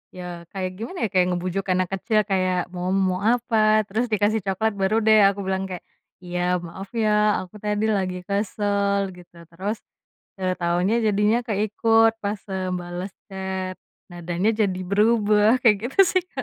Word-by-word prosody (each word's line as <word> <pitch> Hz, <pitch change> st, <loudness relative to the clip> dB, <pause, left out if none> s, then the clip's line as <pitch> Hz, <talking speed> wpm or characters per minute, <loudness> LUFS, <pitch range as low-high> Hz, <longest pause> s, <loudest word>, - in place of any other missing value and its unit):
ya 175 Hz, -2 st, -8 dB
kayak 185 Hz, -2 st, -3 dB
gimana 245 Hz, +12 st, -6 dB
ya, -, -, -15 dB
kayak 180 Hz, -1 st, +3 dB
ngebujuk 185 Hz, +2 st, -3 dB
anak 185 Hz, -1 st, 0 dB
kecil 215 Hz, +2 st, +1 dB
kayak, 185 Hz, -2 st, -1 dB
"Mo 180 Hz, 0 st, -4 dB
mo 185 Hz, -1 st, +1 dB
apa?" 215 Hz, -1 st, +3 dB
Terus 225 Hz, +5 st, -1 dB
dikasih 215 Hz, +1 st, +2 dB
coklat, 220 Hz, +3 st, 0 dB
baru 215 Hz, +4 st, +1 dB
deh 215 Hz, 0 st, +6 dB
aku 200 Hz, 0 st, -1 dB
bilang 190 Hz, 0 st, -2 dB
kayak, 180 Hz, -2 st, -7 dB, 0.4 s
"Iya, 180 Hz, 0 st, -1 dB
maaf 190 Hz, +4 st, -8 dB
ya 210 Hz, -2 st, +2 dB
aku 185 Hz, +3 st, -15 dB
tadi 210 Hz, +1 st, -1 dB
lagi 185 Hz, -3 st, -2 dB
kesel," 200 Hz, 0 st, 0 dB
gitu. 175 Hz, -1 st, -17 dB, 0.2 s
Terus, 200 Hz, +6 st, -3 dB, 0.6 s
"Eee, 185 Hz, -1 st, 0 dB
taunya 175 Hz, +6 st, +1 dB
jadinya 210 Hz, +2 st, +3 dB
keikut 225 Hz, +1 st, +3 dB
pas, 205 Hz, 0 st, -2 dB
eee, 185 Hz, -1 st, -2 dB
bales 175 Hz, +2 st, -5 dB, 0.2 s
chat, 190 Hz, -1 st, -4 dB, 0.3 s
nadanya 175 Hz, +4 st, -1 dB, 0.2 s
jadi 185 Hz, -1 st, -3 dB
berubah," 215 Hz, +2 st, +3 dB
kayak 220 Hz, -4 st, +5 dB, 0.2 s
gitu -, -, -20 dB
sih, 370 Hz, -, +2 dB
Kak. 265 Hz, -, -3 dB
195 Hz, 160 wpm, -23 LUFS, 185-215 Hz, 0.6 s, deh